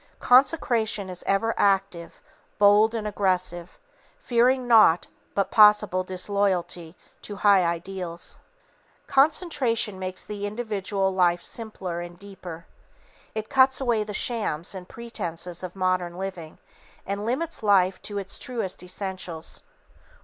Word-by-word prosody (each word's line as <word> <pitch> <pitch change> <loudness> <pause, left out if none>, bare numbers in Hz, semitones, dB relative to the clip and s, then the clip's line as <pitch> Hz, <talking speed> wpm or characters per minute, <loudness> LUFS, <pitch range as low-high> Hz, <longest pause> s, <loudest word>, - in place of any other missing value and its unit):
Consecration 240 - +3
is 180 - -7
ever 225 +4 +1
active, 195 -4 0 0.3
bold 210 +2 +5
and 220 -2 -3
aggressive, 185 -4 -1 0.4
fearing 250 - +2
naught 215 -8 +6 0.3
but 200 -1 0
possible 210 -3 +5
disloyalty 185 -3 -2 0.3
to 205 - -7
high 200 -2 +6
ideals. 170 0 -4 0.7
Concentration 270 - +1
makes 185 0 -5
the 205 -1 -4
individual 205 -3 -2
life 175 -2 +2
simpler 190 -6 -5
and 175 0 -9
deeper. 180 -4 -10 0.7
It 220 0 -3
cuts 265 0 +4
away 240 -5 +1
the 210 - -7
shams 205 -7 -2
and 185 -1 -9
pretences 180 -7 -5
of 185 0 -7
modern 185 -2 -1
living 185 -4 -6 0.5
and 200 +1 -3
limits 270 +9 -2
life 195 -3 +3
to 205 - -5
its 195 -1 -5
truest 225 -7 -4
essentials. 180 -3 -6
195 Hz, 120 wpm, -25 LUFS, 180-220 Hz, 0.7 s, naught